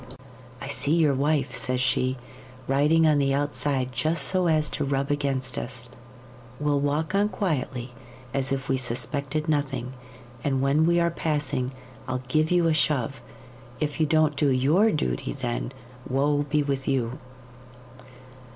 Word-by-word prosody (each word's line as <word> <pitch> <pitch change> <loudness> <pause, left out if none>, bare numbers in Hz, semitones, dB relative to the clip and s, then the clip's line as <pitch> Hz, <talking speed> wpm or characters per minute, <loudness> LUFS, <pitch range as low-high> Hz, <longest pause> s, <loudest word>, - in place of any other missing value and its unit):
"I - - -6
see 140 +2 0
your 155 -4 +4
wife," 145 +2 0
says 130 0 0
she, 130 +1 +1 0.5
"riding 150 +4 +3
on 150 -2 +4
the 135 -1 +2
outside 140 -2 -1
just 155 +7 0
so 185 -2 +2
as 155 -2 +3
to 145 - -2
rub 140 0 -1
against 135 -3 -1
us. 120 -1 -7 0.7
We'll 145 -1 +1
walk 150 +5 -1
on 205 +1 +3
quietly, 130 - -2 0.4
as 135 -1 0
if 135 -1 -2
we 135 - +1
suspected 140 +4 -2
nothing, 135 -4 -1 0.5
and 135 -2 +1
when 140 +4 +3
we 170 0 +3
are 170 0 +2
passing 145 -5 -1 0.4
I'll 130 0 -3
give 155 +3 +2
you 175 -1 +3
a 165 - +3
shove. 140 -4 0 0.6
If 150 0 -2
you 155 - +3
don't 155 -1 +3
do 140 +1 +2
YOUR 150 +12 +3
duty 65 - -2
then, 125 -2 -3 0.4
woe 145 +2 +1
be 150 0 +2
with 135 -2 -2
you!" 130 -2 -1
140 Hz, 150 wpm, -26 LUFS, 130-155 Hz, 0.7 s, your